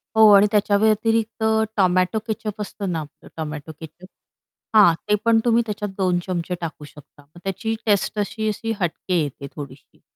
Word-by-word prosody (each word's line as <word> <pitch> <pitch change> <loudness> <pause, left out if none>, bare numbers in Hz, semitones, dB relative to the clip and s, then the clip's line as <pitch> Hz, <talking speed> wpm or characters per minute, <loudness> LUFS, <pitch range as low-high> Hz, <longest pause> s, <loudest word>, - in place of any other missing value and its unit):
हो 220 -1 +8
आणि 200 +1 +7
त्याच्या 205 -1 +3
व्यतिरिक्त 220 +1 +1 0.3
टोमॅटो 185 +2 +2
केचअप 215 -1 -4
असतं 200 -1 -4
ना 165 - -1
आपलं 150 -1 -11
टोमॅटो 155 -1 -5
केचअप? 165 +3 -12 0.7
हां. 205 -6 +7 0.2
ते 210 - +5
पण 230 -1 +5
तुम्ही 235 0 +3
त्याच्यात 210 -1 -4
2 180 -2 +1
चमचे 180 0 -2
टाकू 160 -2 -6
शकता. 145 0 -17
मग 150 +4 -18
त्याची 195 +4 -2
टेस्ट 210 0 +1
अशी-अशी 215 +1 -2
हटके 175 +1 -1
येते 140 -1 -6
थोडीशी. 140 -2 -11
195 Hz, 160 wpm, -22 LUFS, 165-215 Hz, 0.7 s, हो